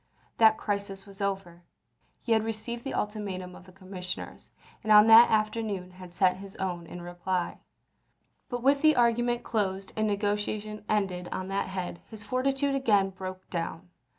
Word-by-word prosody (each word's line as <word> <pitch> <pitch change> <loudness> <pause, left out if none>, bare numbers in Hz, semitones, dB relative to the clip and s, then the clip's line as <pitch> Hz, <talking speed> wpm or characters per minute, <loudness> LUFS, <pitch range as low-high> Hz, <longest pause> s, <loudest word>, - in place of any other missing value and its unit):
That 220 -1 +6
crisis 200 -2 -3
was 200 0 -12
over; 190 -3 -3 0.6
he 235 - -3
had 220 -1 +4
received 225 +2 -4
the 270 - -4
ultimatum 195 -4 -4
of - - -14
the 185 - -15
commissioners, 185 -1 -7 0.3
and 215 - -1
on 210 0 +9
that 225 +1 +9
afternoon 215 -4 -1
had 180 -1 -12
sent 180 +1 +2
his 195 0 -11
own 180 -3 -4
in 175 +1 -8
reply. 175 +1 -3 0.9
But 245 -1 -4
with 275 +1 +4
the 310 0 +5
argument 240 0 +2
closed 195 -3 -2
and 215 0 +1
negotiation 210 +1 -2
ended 190 -4 0
on 185 0 -4
that 195 0 -1
head, 185 -2 -5
his 220 -2 -8
fortitude 270 +5 0
again 210 -8 +2
broke 185 0 -8
down. 170 +1 -4
200 Hz, 160 wpm, -28 LUFS, 185-220 Hz, 0.9 s, on